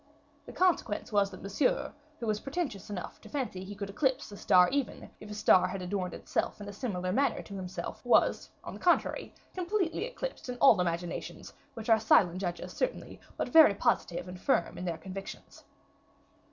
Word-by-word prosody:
The -, -, -7 dB
consequence 350 Hz, -, +1 dB
was 200 Hz, -1 st, +3 dB
that 185 Hz, -2 st, -11 dB
Monsieur, 255 Hz, +8 st, 0 dB, 0.3 s
who 235 Hz, -, -4 dB
was 215 Hz, -1 st, 0 dB
pretentious 275 Hz, -, -4 dB
enough 190 Hz, -4 st, -6 dB
to -, -, -13 dB
fancy 250 Hz, -10 st, -3 dB
he 200 Hz, +2 st, -8 dB
could 200 Hz, 0 st, -5 dB
eclipse 260 Hz, +2 st, 0 dB
a -, -, -8 dB
star 180 Hz, -2 st, +5 dB
even, 275 Hz, -6 st, -3 dB
if 210 Hz, -, -11 dB
a 210 Hz, -, -6 dB
star 185 Hz, -3 st, +5 dB
had 185 Hz, 0 st, -5 dB
adorned 180 Hz, -1 st, -3 dB
itself -, -, -2 dB
in 205 Hz, -, -8 dB
a 205 Hz, -, -7 dB
similar 190 Hz, -5 st, -3 dB
manner 265 Hz, +3 st, +1 dB
to 200 Hz, -, -11 dB
himself, 185 Hz, -1 st, -6 dB
was, -, -, +3 dB
on -, -, -7 dB
the -, -, -9 dB
contrary, -, -, +1 dB, 0.2 s
completely 370 Hz, +1 st, -1 dB
eclipsed -, -, -6 dB
in 250 Hz, -, -4 dB
all 230 Hz, -8 st, +6 dB
imaginations, 170 Hz, 0 st, -4 dB, 0.2 s
which 225 Hz, -1 st, -7 dB
are 225 Hz, -1 st, +5 dB
silent 185 Hz, -4 st, +4 dB
judges 175 Hz, -2 st, -4 dB
certainly, -, -, -3 dB, 0.2 s
but -, -, -2 dB
very 315 Hz, -11 st, +7 dB
positive 175 Hz, -2 st, 0 dB
and 180 Hz, 0 st, -9 dB
firm 170 Hz, -, +1 dB
in 180 Hz, -, -6 dB
their 170 Hz, -2 st, -2 dB
convictions. 190 Hz, +4 st, -9 dB
205 Hz, 185 wpm, -30 LUFS, 185-265 Hz, 0.3 s, very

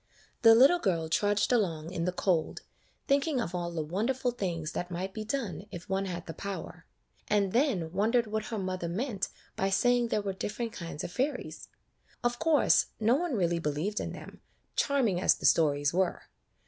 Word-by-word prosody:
The 225 Hz, -1 st, +8 dB
little 275 Hz, +9 st, +6 dB
girl 170 Hz, -, 0 dB
trudged 205 Hz, +7 st, +2 dB
along 170 Hz, -8 st, 0 dB
in 170 Hz, -2 st, -2 dB
the 180 Hz, -, +1 dB
cold, 180 Hz, -2 st, 0 dB, 0.4 s
thinking 280 Hz, 0 st, +2 dB
of 210 Hz, -7 st, -3 dB
all 175 Hz, -1 st, -2 dB
the 165 Hz, -2 st, -3 dB
wonderful 235 Hz, +10 st, -1 dB
things 170 Hz, -8 st, -3 dB
that 175 Hz, -, -4 dB
might 185 Hz, +2 st, -4 dB
be 215 Hz, -, -4 dB
done 215 Hz, -4 st, -3 dB
if 175 Hz, -2 st, -9 dB
one 195 Hz, 0 st, -1 dB
had 175 Hz, -2 st, -5 dB
the 165 Hz, -, -6 dB
power; 180 Hz, -3 st, -7 dB, 0.4 s
and 200 Hz, -2 st, +1 dB
then 225 Hz, -, +1 dB
won 205 Hz, +5 st, +1 dB
dered 240 Hz, -1 st, +3 dB
what 215 Hz, 0 st, -3 dB
her 225 Hz, -, -4 dB
mother 185 Hz, -3 st, -3 dB
meant 210 Hz, +3 st, -2 dB, 0.3 s
by 195 Hz, -, 0 dB
saying 245 Hz, +4 st, +3 dB
there 210 Hz, -2 st, -1 dB
were 195 Hz, -1 st, -2 dB
different 220 Hz, +4 st, -4 dB
kinds 170 Hz, -4 st, -6 dB
of -, -, -5 dB
fairies. 265 Hz, +9 st, -3 dB, 0.6 s
Of 240 Hz, 0 st, 0 dB
course, 320 Hz, -3 st, +4 dB
no 225 Hz, +2 st, +3 dB
one 315 Hz, 0 st, 0 dB
really 170 Hz, -4 st, +1 dB
believed 165 Hz, +7 st, -2 dB
in -, -, -4 dB
them, -, -, -11 dB, 0.3 s
charming 240 Hz, -11 st, +1 dB
as -, -, +5 dB
the -, -, -6 dB
stories 145 Hz, -2 st, +3 dB
were. 185 Hz, 0 st, 0 dB
195 Hz, 185 wpm, -30 LUFS, 175-235 Hz, 0.6 s, The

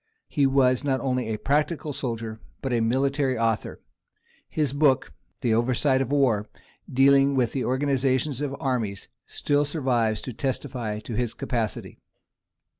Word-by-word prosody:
He 145 Hz, -4 st, +2 dB
was 130 Hz, -1 st, +3 dB
not 135 Hz, -2 st, +1 dB
only 125 Hz, -2 st, -1 dB
a 110 Hz, -1 st, -2 dB
practical 150 Hz, +3 st, 0 dB
soldier, 115 Hz, -4 st, -4 dB, 0.2 s
but 135 Hz, -2 st, -1 dB
a 120 Hz, -, +2 dB
military 135 Hz, +3 st, +1 dB
author: 115 Hz, -1 st, -1 dB, 0.7 s
his 150 Hz, -4 st, 0 dB
book, 140 Hz, -3 st, +2 dB, 0.3 s
Περὶ 120 Hz, -, +1 dB
Παραδρόμης 130 Hz, +1 st, +1 dB
πολέμου, 130 Hz, -8 st, +2 dB, 0.5 s
dealing 140 Hz, +1 st, +5 dB
with 125 Hz, -3 st, +2 dB
the 130 Hz, -, -2 dB
organization 135 Hz, +1 st, +1 dB
of 140 Hz, -1 st, -2 dB
armies, 115 Hz, -7 st, -2 dB, 0.2 s
still 145 Hz, 0 st, +1 dB
survives 125 Hz, -8 st, 0 dB
to 125 Hz, -, -6 dB
testify 125 Hz, -4 st, -3 dB
to 115 Hz, -, -7 dB
his 120 Hz, 0 st, -1 dB
capacity. 115 Hz, -4 st, -3 dB
130 Hz, 135 wpm, -25 LUFS, 115-140 Hz, 0.7 s, dealing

